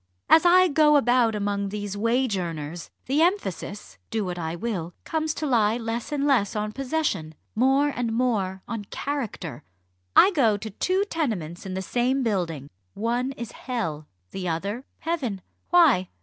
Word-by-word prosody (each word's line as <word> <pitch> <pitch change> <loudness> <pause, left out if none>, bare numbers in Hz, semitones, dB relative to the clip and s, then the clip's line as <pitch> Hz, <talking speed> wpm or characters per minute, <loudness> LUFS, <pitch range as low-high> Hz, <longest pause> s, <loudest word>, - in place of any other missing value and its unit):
as 325 +2 +7
I 370 +1 +7
go 300 -1 +4
about 245 -4 +3
among 200 -1 -1
these 205 -1 -4
wage 230 +2 +1
earners, 165 -2 -5 0.2
the 280 +4 +1
emphasis 210 - -1
do 220 -3 -1
what 180 -1 -4
I 160 0 -3
will 175 -4 -4
comes 315 -1 -1
to 310 - -3
lie 230 -5 +3
less 230 +1 -4
and 285 -1 0
less 245 -9 +2
on 210 0 -1
possession 255 - -2 0.2
more 270 +5 +3
and 245 -4 -2
more 210 -6 0
on 225 -3 -4
character. 220 - -4 0.5
I 395 - +8
go 235 - +3
to 220 +1 -7
two 370 - +1
tenements 200 - -3
in 185 - -4
the 190 - -3
same 255 +5 +1
building. 170 - -2 0.2
One 240 +5 -1
is 235 -3 -7
Hell 165 - -4 0.2
the 185 -2 -4
other 200 +10 -3 0.2
Heaven. 265 - -2 0.3
Why? 310 - +5
225 Hz, 160 wpm, -25 LUFS, 190-275 Hz, 0.5 s, I